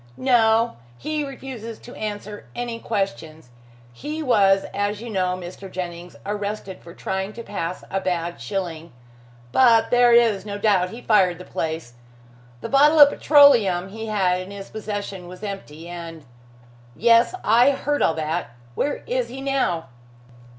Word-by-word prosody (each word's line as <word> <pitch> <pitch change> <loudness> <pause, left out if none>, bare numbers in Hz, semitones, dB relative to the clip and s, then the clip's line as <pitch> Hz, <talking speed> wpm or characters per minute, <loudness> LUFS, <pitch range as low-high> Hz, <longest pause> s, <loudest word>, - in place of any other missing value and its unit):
"No. 230 - +3 0.2
He 305 - -3
refuses 255 -5 -7
to 245 - -13
answer 210 -1 -6
any 240 -1 -4
questions. 160 - -4 0.4
He 305 - -5
was, 195 -7 +4
as 205 +1 -1
you 235 +1 -7
know, 185 -2 0
Mr. 185 +2 -9
Jennings, 175 -1 -6
arrested 205 -1 -4
for 170 0 -13
trying 190 +2 -3
to 235 - -8
pass 180 -4 -5
a 195 - -1
bad 175 -2 -3
shilling, 170 -6 -5 0.6
but 235 -3 +4
there 245 -1 +5
is 230 -5 +4
no 205 -1 -5
doubt 200 -4 +2
he 230 +5 -10
fired 190 -6 +3
the 180 - -11
place. 160 -6 -4 0.7
The - - -5
bottle 295 +3 +5
of 290 -1 +10
petroleum 230 - +5
he 220 +2 -7
had 185 -4 +1
in 185 - -9
his 200 -1 -9
possession 205 -4 -5
was 180 +3 -11
empty, 170 -6 -7
and 165 -3 -8 0.4
" 120 0 -25 0.2
"Yes! 235 +8 +4
I 235 +5 +5
heard 290 +1 -1
all 160 - +3
that. 160 -5 -3 0.2
Where 285 - -2
is - - -1
he 265 - -8
now?" 270 -12 -1
205 Hz, 155 wpm, -23 LUFS, 180-235 Hz, 0.7 s, of